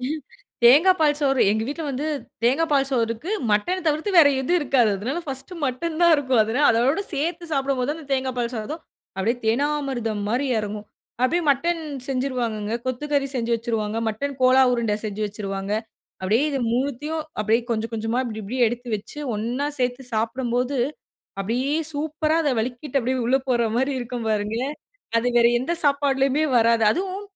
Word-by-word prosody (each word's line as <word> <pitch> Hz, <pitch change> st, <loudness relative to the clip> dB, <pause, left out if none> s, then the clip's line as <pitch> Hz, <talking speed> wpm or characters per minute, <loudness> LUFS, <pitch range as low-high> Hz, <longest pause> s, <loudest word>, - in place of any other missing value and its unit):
ம். 295 Hz, +5 st, -3 dB, 0.4 s
தேங்கா 295 Hz, +10 st, +8 dB
பால் 295 Hz, -2 st, +4 dB
சோறு 270 Hz, -2 st, +2 dB
எங்க 220 Hz, +1 st, +1 dB
வீட்ல 295 Hz, +5 st, -4 dB
வந்து 270 Hz, +2 st, -3 dB, 0.4 s
தேங்கா 265 Hz, +8 st, +3 dB
பால் 275 Hz, -1 st, +3 dB
சோறுக்கு. 230 Hz, -, -1 dB, 0.2 s
மட்டன் 350 Hz, -, +1 dB
தவிர்த்து 310 Hz, +6 st, +1 dB
வேறு 295 Hz, -4 st, +8 dB
எதுவும் 350 Hz, +7 st, +2 dB
இருக்காது. 260 Hz, -7 st, +3 dB
அதனால 255 Hz, -, -3 dB
பர்ஸ்ட்டு 270 Hz, +7 st, -6 dB
மட்டன் 300 Hz, +5 st, -2 dB
தான் 340 Hz, -1 st, +7 dB
இருக்கும். 260 Hz, -5 st, +2 dB
அதனால 240 Hz, +7 st, +2 dB, 0.2 s
அதோட 275 Hz, +9 st, +2 dB
சேர்த்து 335 Hz, +5 st, -2 dB
சாப்டும்போது 275 Hz, 0 st, 0 dB
அந்த 320 Hz, -1 st, -10 dB
தேங்கா 260 Hz, -1 st, 0 dB
பால் 240 Hz, 0 st, -1 dB
சாதம், 240 Hz, +9 st, -5 dB, 0.4 s
அப்டியே 225 Hz, +6 st, +1 dB
தேனாமிருதம் 255 Hz, -4 st, 0 dB
மாரி 250 Hz, +6 st, 0 dB
எறங்கும். 210 Hz, 0 st, -5 dB, 0.4 s
அப்டியே 345 Hz, +7 st, +2 dB
மட்டன் 330 Hz, +5 st, +1 dB, 0.3 s
செஞ்சுருவாங்கங்க. 245 Hz, -5 st, -2 dB
கொத்துக்கறி 275 Hz, +2 st, -1 dB
செஞ்சு 235 Hz, -1 st, -1 dB
வச்சிருவாங்க, 225 Hz, -2 st, -2 dB
மட்டன் 270 Hz, +6 st, -3 dB
கோலா 255 Hz, +1 st, +6 dB
உருண்ட 230 Hz, -3 st, 0 dB
செஞ்சு 215 Hz, 0 st, -3 dB
வச்சிருவாங்க. 195 Hz, -1 st, -4 dB, 0.5 s
அப்டியே 220 Hz, +9 st, +2 dB
இது 275 Hz, -, -1 dB
3த்தயும் 285 Hz, +5 st, -2 dB, 0.2 s
அப்டியே 220 Hz, +2 st, +2 dB
கொஞ்சம் 225 Hz, 0 st, -2 dB
கொஞ்சமா 225 Hz, +2 st, -1 dB
இப்டி 220 Hz, -3 st, -5 dB
இப்டி 215 Hz, +6 st, -5 dB
எடுத்து 240 Hz, +2 st, -4 dB
வச்சு 205 Hz, +8 st, -11 dB, 0.2 s
ஒண்ணா 240 Hz, +7 st, -2 dB
சேர்த்து 250 Hz, +1 st, -1 dB
சாப்டும்போது, 245 Hz, +3 st, -1 dB, 0.6 s
அப்டியே 245 Hz, +8 st, -1 dB, 0.2 s
சூப்பரா 310 Hz, +1 st, -1 dB
அத 300 Hz, -, +1 dB
வழிக்கிட்டு 255 Hz, +5 st, -2 dB
அப்டியே 260 Hz, +2 st, -1 dB
உள்ள 255 Hz, +3 st, +4 dB
போற 240 Hz, -2 st, +2 dB
மாரி 265 Hz, +3 st, +1 dB
இருக்கும் 240 Hz, -1 st, -5 dB
பாருங்க. 210 Hz, +1 st, -1 dB, 0.6 s
அது 240 Hz, +2 st, 0 dB
வேற 235 Hz, -, +6 dB
எந்த 265 Hz, +7 st, -2 dB
சாப்பாடுலயுமே 280 Hz, 0 st, +2 dB
வராது. 230 Hz, 0 st, +3 dB
அதுவும் 380 Hz, -, -3 dB
255 Hz, 160 wpm, -23 LUFS, 230-285 Hz, 0.6 s, தேங்கா